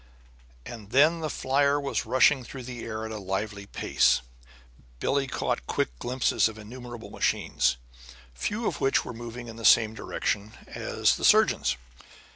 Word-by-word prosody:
And 110 -4 -9
then 155 +7 +4
the 155 -1 -3
flier 140 +1 +1
was 140 -1 -2
rushing 130 +1 +4
through 130 +1 -9
the 120 -1 -7
air 110 -1 -4
at 110 - -6
a 110 - -5
lively 100 +1 -4 0.2
rate. - - +3 0.8
Billie 135 - 0
caught 60 - -2
quick - - 0
glimpses 125 -2 +1
of 110 - -11
innumerable 120 +2 -9
machines, - - +1 0.6
few 210 - -3
of - - -2
which 135 - +2
were - - -6
moving 120 +1 -8
in 115 0 -9
the 115 - -9
same 110 0 +6
direction 105 -1 -3 0.2
as - - 0
the - - -8
surgeon's. - - +4
120 Hz, 155 wpm, -27 LUFS, 110-135 Hz, 0.8 s, same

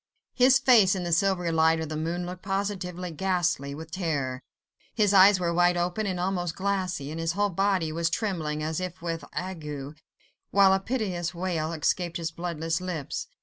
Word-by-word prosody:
His 260 +1 +5
face 235 -8 +5
in 185 - -3
the 175 - -3
silvery 180 0 +2
light 160 0 +3
of 160 -2 -4
the 155 - -4
moon 170 +3 -2
looked 180 +1 -7
positively 190 -3 -3
ghastly 175 -5 -1
with 160 +2 -9
terror: 145 -8 -2 0.5
his 210 -3 +3
eyes 195 0 +7
were 170 -1 0
wide 175 +1 +3
open 180 +5 -1
and 185 -2 -2
almost 175 -2 -1
glassy, 185 -6 -2
and 160 - -5
his 165 0 -1
whole 205 +1 +1
body 190 -3 +1
was 165 +1 0
trembling, 160 -8 -2
as 155 +1 -2
if 185 -1 -5
with 165 -2 -3
ague, 150 -5 -6 0.5
while 195 -1 +5
a 190 - +2
piteous 190 -6 -3
wail 170 -3 -2
escaped 170 +2 -1
his 165 -1 -3
bloodless 165 -1 -3
lips. 170 -6 -4
175 Hz, 180 wpm, -27 LUFS, 160-190 Hz, 0.5 s, eyes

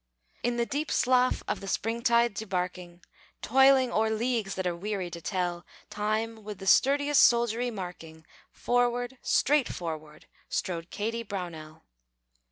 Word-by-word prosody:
In 240 0 -1
the 235 - +1
deep 290 +4 -3
slough 255 0 +2
of - - -2
the 195 - -8
springtide 235 +2 +1
debarking, 180 -3 -4 0.4
Toiling 265 0 +5
o'er 220 +1 +1
leagues 220 -2 -1
that 190 - -3
are 175 -1 0
weary 190 -1 -4
to 170 0 -7
tell, 175 -2 -2 0.3
Time 215 +1 -2
with 210 -1 -7
the 195 - -9
sturdiest 285 +7 +4
soldiery 235 0 +3
marking, 175 -6 -8 0.3
Forward, 245 +1 0
straight 290 -2 +2
forward, 155 -3 -6 0.2
strode 170 -2 -3
Kady 225 +2 -3
Brownell. 170 -7 -7
215 Hz, 135 wpm, -28 LUFS, 180-245 Hz, 0.4 s, Toiling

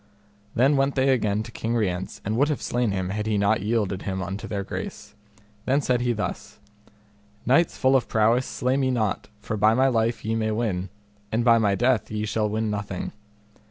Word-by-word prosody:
Then 135 +4 +4
went 135 0 +1
they 135 0 +2
again 110 -5 +1
to 115 - -10
King 115 +1 -2
Rience 95 -5 -2
and 105 +2 -1
would 140 +5 +3
have 150 - -1
slain 120 -2 0
him 95 -2 -2
had 105 +2 -3
he 110 -1 +1
not 100 +1 +2
yielded 105 -3 -1
him 95 -1 -3
unto 95 +4 -5
their 100 -1 -3
grace. - - -7 0.5
Then 135 +2 +3
said 125 -4 +1
he 120 0 +1
thus: 105 -3 -4 0.9
Knights 140 +8 +3
full 130 +1 +3
of 130 - +2
prowess, 115 +4 +2
slay 130 +2 0
me 135 -1 +1
not, 110 -6 -1
for 105 +1 -4
by 110 +2 +4
my 130 +2 +4
life 115 -2 0
ye 110 - 0
may 110 -1 0
win, 105 -5 -1 0.4
and 115 +2 0
by 115 -1 +6
my 100 -3 +2
death 125 +1 +1
ye 105 0 -2
shall 110 0 0
win 110 0 -1
nothing. 100 -3 -4
110 Hz, 200 wpm, -25 LUFS, 105-125 Hz, 0.9 s, by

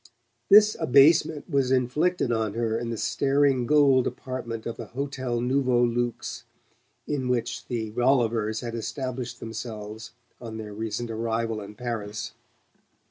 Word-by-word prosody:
This 210 +1 +7
abasement 150 +3 +4
was 140 -5 +1
inflicted 130 +4 +1
on 110 -2 -1
her 115 -1 0
in 115 0 -3
the 115 - -3
staring 135 +2 +2
gold 140 -3 +4
apartment 120 -3 -5
of 115 - -4
the 115 - -8
Hotel 130 -4 -2
Nouveau 125 -1 +2
Luxe 120 0 -2 0.6
in 140 -4 -2
which 120 -2 -2
the 110 -3 -3
Rollivers 115 -3 +1
had 120 -2 -5
established 125 +1 -4
themselves 110 -1 -7 0.3
on 115 -2 -7
their 105 -2 -7
recent 110 +2 -4
arrival 115 -1 -2
in 105 +1 -10
Paris. 110 -3 -5
120 Hz, 135 wpm, -26 LUFS, 115-130 Hz, 0.6 s, This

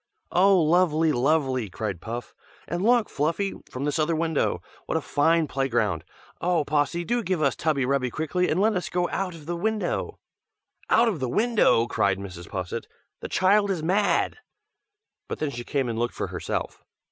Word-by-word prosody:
"Oh! 190 +1 +5
lovely, 160 -1 +3
lovely!" 130 -4 +1
cried 95 -1 -4
Puff. 120 +4 -6 0.3
"And 175 +2 -2
look, 235 +1 +4
Fluffy, 165 +7 -1 0.2
from 130 - -5
this 145 +2 0
other 160 +2 +1
window. 160 -1 0 0.2
What - - 0
a - - +1
fine 165 +3 +2
play 135 0 -1
ground! 105 -9 0 0.4
Oh! 170 -4 +1
Possy, 150 +4 0
do 240 +6 0
give 185 -5 -1
us 140 -3 +2
tubby 150 -5 0
rubby 130 -1 +1
quickly, 160 +7 -1
and 165 - +1
let 215 +2 +3
us 180 - -2
get 175 0 0
out 185 -3 -2
of 155 -3 -12
the 175 +2 -3
window!" 215 +4 -2 0.7
"Out 235 +1 +5
of 200 -9 -1
the 130 -2 -2
window!" 215 - +3
cried 100 -5 +1
Mrs. 90 -3 -8
Posset; 90 -2 -4 0.3
"The - - -7
child 200 +2 +3
is 180 -5 -1
mad!" 195 - +1 0.9
but - - -4
then 150 -2 -2
she 120 -2 -6
came 135 0 -1
and 115 -1 -3
looked 120 0 -1
for - - -3
herself. - - -4
155 Hz, 180 wpm, -25 LUFS, 130-185 Hz, 0.9 s, Oh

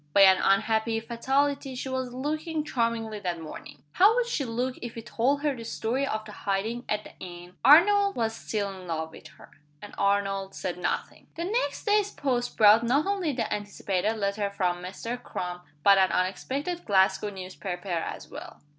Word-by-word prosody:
By 200 - +6
an 190 -1 +8
unhappy 220 +3 +2
fatality 270 +4 0
she 255 - -4
was 260 -1 -3
looking 305 +4 -2
charmingly 230 -5 -1
that 175 -4 -3
morning. 155 -1 -10
How 410 +5 +5
would - - +2
she 390 - -2
look 250 +2 -2
if 240 -1 -6
he 230 - -7
told 275 +6 0
her 290 -2 +1
the 230 - -8
story 245 +4 -1
of 215 -2 -3
the 215 - -9
hiding 210 +5 -2
at 210 0 0
the - - -13
inn? 175 0 -10
Arnold 400 +7 +6
was 225 -1 0
still 205 -3 -3
in 185 -1 -10
love 160 -1 -3
with - - -12
her - - -16 0.3
and 205 - -11
Arnold 195 -1 0
said 180 -1 -4
nothing. - - -3
The 335 - -3
next 455 +7 -1
day's 415 -1 +3
post 250 -8 -2
brought 215 +1 +7
not 265 +6 +2
only 390 -5 0
the 235 -6 -2
anticipated 205 0 -2
letter 200 0 -1
from 180 -3 -1
Mr. 230 +7 -5
Crum, 180 -5 -5 0.2
but 200 -1 +7
an 190 -1 +4
unexpected 275 - -2
Glasgow 190 0 +3
newspaper 185 -1 -6
as 170 -2 -3
well. - - -10
225 Hz, 180 wpm, -27 LUFS, 195-270 Hz, 0.3 s, an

